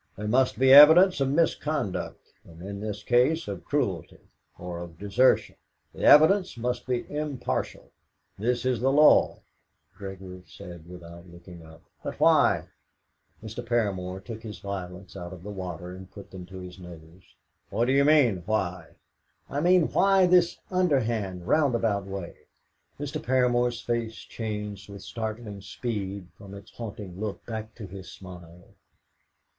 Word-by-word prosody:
There 105 +1 -5
must 125 +4 +2
be 130 +1 +5
evidence 160 +4 +8
of 135 - +2
misconduct, 150 - -2
and 85 -1 -16
in 100 +1 -6
this 105 0 -5
case 130 +7 +2
of 100 -3 -6
cruelty - - -3 0.3
or 90 -1 -6
of 85 -1 -10
desertion. 105 +7 +2 0.4
The - - -8
evidence 180 +1 +6
must 125 +1 -3
be 125 -1 -1
impartial. 150 -3 -4 0.5
This 120 +3 -1
is 125 -3 +1
the 135 +1 +2
law." 150 +2 +5 0.5
Gregory 95 -2 -9
said 85 -2 -12
without 85 0 -12
looking 85 0 -13
up: 80 +1 -16 0.2
"But - - -6
why?" - - +4 0.7
Mr. 110 +2 -7
Paramor 95 -6 -2
took 110 +1 -8
his 110 -3 -8
violets 95 -1 -7
out 90 -1 -7
of 90 -2 -12
the 105 - -7
water, 90 -2 -6
and 95 0 -11
put 100 +1 -13
them 90 -2 -9
to 95 +1 -10
his 90 +1 -10
nose. 85 0 -14 0.3
"How 115 - 0
do 130 - +1
you 140 +1 +4
mean 140 - +4
why?" 95 -5 -2 0.6
"I 145 - -1
mean, 180 -1 +4
why 195 -1 +4
this 180 -1 +3
underhand, 115 - 0
roundabout 115 -9 +1
way?" 95 -3 -7 0.6
Mr. 145 +1 -4
Paramor's 125 -3 +1
face 115 -2 -2
changed 105 -3 -6
with 100 -1 -10
startling 110 -2 -6
speed 100 -5 -5
from 100 0 -11
its 100 - -13
haunting 100 -5 -8
look 105 -1 -5
back 110 -1 -6
to 115 - -8
his 95 0 -10
smile. 90 -2 -13
105 Hz, 150 wpm, -26 LUFS, 95-130 Hz, 0.7 s, evidence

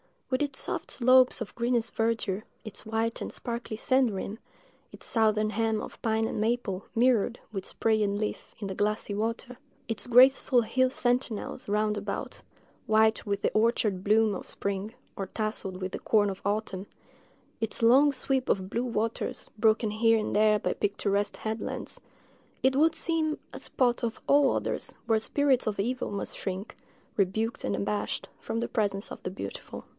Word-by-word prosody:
With 255 - +1
its 280 -2 -1
soft - - -3
slopes 255 0 +5
of 225 - -5
greenest 235 -1 0
verdure—its 220 -1 -3
white 225 +1 -1
and - - -5
sparkling 235 -2 -5
sand 255 0 +3
rim—its 205 +4 -10
southern 215 -2 +2
hem 225 0 0
of - - -9
pine 220 -1 +1
and 225 - -3
maple, 215 -4 -1
mirrored, 240 -1 +3
with 195 -3 -4
spray 220 -1 +1
and 200 -1 +1
leaf, 210 0 -4
in 205 - -4
the 190 - -3
glassy 210 +1 0
water—its 225 0 -5
graceful 250 0 +6
hill 255 +3 +2
sentinels 245 -3 -1
round 210 +1 +1
about, 200 -1 -4 0.5
white 220 0 +3
with 200 0 -1
the - - +1
orchard 215 -4 +1
bloom 215 0 +4
of 185 - -6
spring, 200 +2 -3 0.2
or 195 - -3
tasselled 200 -3 -3
with 185 0 -3
the - - -5
corn 210 -2 +3
of 195 - -6
autumn—its 205 +2 -5
long 275 +5 +6
sweep 265 0 -1
of 190 -1 0
blue 235 +4 -1
waters, 230 -1 -2
broken 220 0 +3
here 225 +1 +4
and 215 - -2
there 215 0 +5
by - - -1
picturesque 205 0 0
headlands—it 225 +3 -5
would 315 +3 +4
seem 320 -2 0
a - - -7
spot, 245 -2 +1
of 230 -2 -2
all 280 -1 +5
others, - - -1
where 225 -1 +3
spirits 270 +2 +2
of 210 -2 -1
evil 250 +5 -1
must 200 -1 -4
shrink, 190 +2 -5 0.4
rebuked 220 +4 0
and 100 - 0
abashed, 105 +1 -2
from 230 - -3
the 235 - -2
presence 200 -2 -1
of - - -8
the - - -2
beautiful. 100 - -7
220 Hz, 160 wpm, -28 LUFS, 205-240 Hz, 0.5 s, graceful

